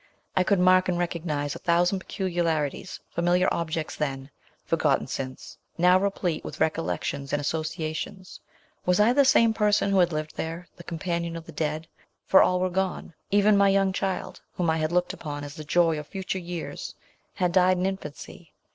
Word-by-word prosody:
I 185 - +4
could 200 +2 +2
mark 185 0 +5
and 175 - 0
recognise 155 -5 -2
a - - -8
thousand 175 +3 +2
peculiarities, 170 -5 -2
familiar 175 +2 +2
objects 160 -1 -2
then, 135 -2 -3 0.3
forgotten - - +1
since 130 -1 -6 0.2
now 180 +2 +5
replete 190 -4 -1
with - - -8
recollections 155 -3 -1
and 145 - +1
associations. 160 +5 -4 0.4
Was 180 +2 +2
I 220 +4 +5
the 280 +2 +5
same 230 -4 +5
person 210 -2 +2
who 195 - +4
had 175 -1 +4
lived 155 0 -4
there, 165 +2 -4
the 170 - -12
com 170 - -5
panion 170 -1 -2
of 165 - -9
the 165 - -10
dead 155 +1 -3 0.4
for 190 - +6
all 180 - +3
were 185 0 0
gone? 190 -2 -2 0.2
Even 205 +1 +4
my 200 0 +5
young 195 -1 +2
child, 190 0 -3
whom 170 -3 +1
I 160 - +1
had 155 0 -1
looked 180 0 +1
upon 145 -2 -6
as 145 -1 -7
the 155 - -8
joy 165 0 +2
of 150 - -9
future 190 -1 -4
years, 175 -2 -6 0.4
had 180 -3 +1
died 185 0 +4
in 180 - 0
infancy. 175 -2 -6
175 Hz, 180 wpm, -26 LUFS, 155-185 Hz, 0.4 s, for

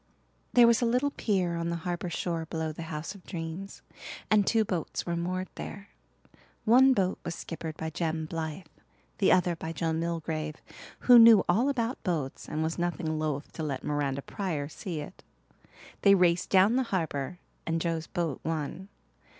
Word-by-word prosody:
There 245 -1 +8
was 235 0 +4
a - - +3
little 250 +5 +1
pier 185 -9 0
on 170 0 -2
the 170 - -1
harbour 175 0 -2
shore 165 -1 -3
below 160 -1 -3
the 155 - -8
House 155 +4 -5
of 200 -3 -15
Dreams, 170 +2 -6 0.5
and 210 -2 +4
two 225 -1 +3
boats 180 -5 -3
were 170 - -1
moored 185 +2 -2
there. 200 0 -8 0.8
One 255 +4 +7
boat 190 -3 0
was 170 - -4
skippered 160 -1 -6
by 160 0 -4
Jem 160 0 -2
Blythe, 160 +2 -4 0.6
the 195 - +4
other 180 -1 +3
by 160 0 -5
Joe 165 +1 -1
Milgrave, 160 -2 -2 0.5
who 245 -1 +8
knew 230 -3 +9
all 225 +10 +3
about 245 -2 -1
boats 160 -9 -3
and 155 +1 -1
was 160 +2 -2
nothing 170 -2 -1
loth 150 -2 -3
to - - -6
let 140 -4 -3
Miranda 140 -2 -1
Pryor 165 -8 -3
see 160 +1 -5
it. 150 - -11 0.8
They 200 -1 +7
raced 175 -2 +2
down 195 +5 +5
the - - +3
harbour 160 -4 -2 0.3
and 165 0 0
Joe's 165 -1 -2
boat 170 -7 -2
won. 160 +4 -3
170 Hz, 175 wpm, -29 LUFS, 160-195 Hz, 0.8 s, knew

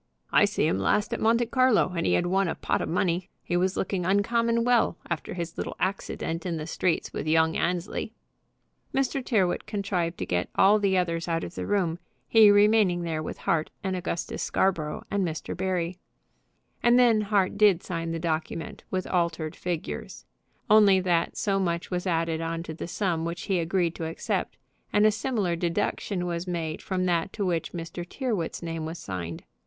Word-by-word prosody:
I - - +6
see - - 0
him 95 - +1
last 205 - +1
at - - -2
Monte 230 +2 +3
Carlo, 250 -6 +3
and 165 - 0
he - - +3
had 175 - +2
won 190 +2 +2
a - - -2
pot - - -1
of - - -3
money. 175 +1 0
He 175 - -2
was 185 +2 +1
looking 185 -1 -1
uncommon 230 +5 +2
well 240 -7 +3
after 170 +1 -3
his 170 -1 -5
little - - -4
accident 175 -3 -2
in 170 -3 -2
the 155 - -4
streets 175 0 -1
with 155 - -4
young 160 +1 +3
Annesley." 180 +5 -2 0.8
Mr. 270 0 0
Tyrrwhit 195 -8 +1
contrived 185 -5 -2
to - - -3
get 90 0 -1
all 205 +2 +5
the 195 -2 +2
others 170 -2 -1
out 165 -1 0
of - - -6
the - - -5
room, 180 -5 0 0.3
he 220 -2 +7
remaining 205 -3 +4
there 160 -2 -2
with 155 - -5
Hart 160 -2 0
and 190 -1 -1
Augustus 175 -2 -3
Scarborough 165 -6 0
and 200 -1 +1
Mr. 160 -3 -3
Barry. 180 -1 -2 0.8
And 240 +1 +5
then 235 -3 +5
Hart 200 -2 +1
did 205 -4 +4
sign 165 -2 -3
the 165 - -2
document 160 0 -3
with 185 -1 -2
altered 170 -3 -1
figures: 175 -3 -5 0.4
only 210 -3 +6
that 175 -2 0
so 195 -1 +1
much 170 -2 -2
was 180 +1 -2
added 165 -2 0
on 165 0 -3
to 160 - -6
the 165 - -6
sum 175 -3 -1
which 170 +1 -4
he 190 -3 0
agreed 170 0 0
to 165 - -3
accept, 165 - -3 0.3
and 210 +1 +4
a 215 - +6
similar 215 -5 -1
deduction 175 +2 -1 0.2
made 165 -3 -3
from 185 -1 -1
that 175 0 +1
to 205 - -2
which 170 -3 -1
Mr. 170 0 -6
Tyrrwhit's 200 -4 -3
name 165 -1 -3
was 165 +2 -6
signed. 85 - -6
180 Hz, 185 wpm, -27 LUFS, 165-200 Hz, 0.8 s, he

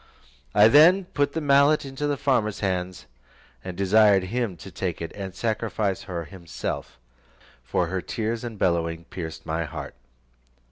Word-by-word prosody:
I 105 +1 +8
then 170 +9 +6
put 145 -4 -1
the 160 - -2
mallet 140 +1 +4
into 135 +2 -3
the 145 -1 0
farmer's 115 -7 0
hands, 90 -2 -2 0.6
and 90 -2 -7
desired 100 0 +4
him 110 -1 -2
to 95 - -11
take 90 -1 -3
it 85 -1 -5
and 95 -2 -7
sacrifice 110 -3 -1
her 85 -3 -5
himself, 85 -6 -6 0.7
for 65 +8 0
her 95 +2 -3
tears 115 +3 -3
and 115 -3 -6
bellowing 85 -3 0
pierced 80 -2 -7
my 80 +1 -2
heart. 75 - -7
100 Hz, 150 wpm, -25 LUFS, 90-120 Hz, 0.7 s, I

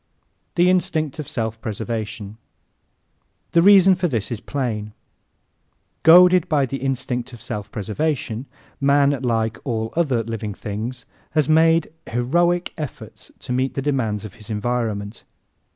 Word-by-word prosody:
The 175 +1 +4
Instinct 160 -5 +1
of 150 - -5
Self 110 -1 -3
Preservation 110 -1 -5 1.1
¶ - - -41
The 170 - +4
reason 195 0 +7
for 180 0 0
this 115 - -2
is 115 - -3
plain. 110 -6 -3 1.1
Goaded 180 +1 +7
by 145 -3 +3
the 135 +1 -4
instinct 130 -2 -3
of 120 - -10
self 105 -1 -6
preservation, 120 +2 -2 0.3
man, 140 0 +4
like 115 -3 0
all 110 -3 -3
other 135 -9 +1
living 110 -2 -5
things, 115 +5 -5 0.3
has 155 -3 +2
made 160 0 +3 0.2
heroic 175 +9 +1
efforts 150 -3 -8
to 125 - -4
meet 130 +1 0
the 135 - -1
demands 115 -7 -1
of 100 - -9
his 105 - -13
environment. 110 -1 -2
125 Hz, 135 wpm, -22 LUFS, 110-155 Hz, 1.1 s, reason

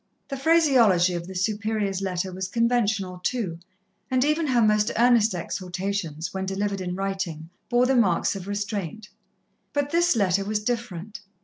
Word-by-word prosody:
The 275 - -3
phraseology 260 - +4
of 170 0 -4
the 190 - -8
Superior's 210 0 -1
letter 185 -1 -2
was 185 0 -3
conventional, 220 -4 0
too, 185 -5 -2 0.5
and 255 0 +2
even 305 +1 +1
her 250 -3 +2
most 210 -1 +3
earnest 230 -3 +4
exhortations, 180 -2 -4
when 190 0 -3
delivered 200 0 -2
in 180 -1 -3
writing, 190 -4 -4 0.2
bore 245 0 +3
the 265 +1 +2
marks 200 -5 +2
of 195 -1 -7
restraint. 205 0 -4 0.6
But 285 0 -1
this 345 -2 +3
letter 195 -2 +2
was 210 +1 -2
different. 220 -3 -4
205 Hz, 150 wpm, -25 LUFS, 185-235 Hz, 0.6 s, phraseology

